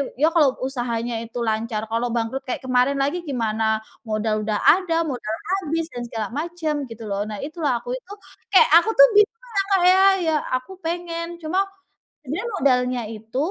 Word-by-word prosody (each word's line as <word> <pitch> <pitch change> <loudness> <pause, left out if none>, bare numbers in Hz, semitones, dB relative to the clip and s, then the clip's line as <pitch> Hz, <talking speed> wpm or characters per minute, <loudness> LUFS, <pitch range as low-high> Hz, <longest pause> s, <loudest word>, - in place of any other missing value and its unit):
ya 305 +5 +3
kalau 290 -6 +4
usahanya 240 -3 -2
itu 235 +1 -7
lancar, 220 0 -1
kalau 230 +2 0
bangkrut 235 +4 -2
kayak 255 - -3
kemarin 255 +2 +2
lagi 290 +6 -1
gimana? 220 -4 0 0.2
Modal 215 0 0
udah 210 0 -1
ada, 335 -3 +4
modal 245 -7 -3 0.2
habis, 330 -1 -2
dan 245 - -5
segala 225 -2 -4
macem," 320 +2 -3 0.2
gitu 230 0 -9
loh, 200 +1 -1
nah 210 - -5
itu 310 +4 -7
lah 255 -5 +2
aku 245 - -5
itu, 370 +10 -12 0.4
kayak - - +7
aku 345 +6 +3
tuh - - +11
bingung 455 +3 +1
lah, 395 - +3
Kak, 375 - +2
ya, 380 +1 +5 0.2
ya 320 - +2 0.2
aku 255 +8 -5
pengen, 335 -1 -3 0.2
cuma 345 +5 0 0.7
sebenernya 330 - -3
modalnya 250 -2 +2
itu, 225 +2 -8
255 Hz, 180 wpm, -22 LUFS, 225-330 Hz, 0.7 s, tuh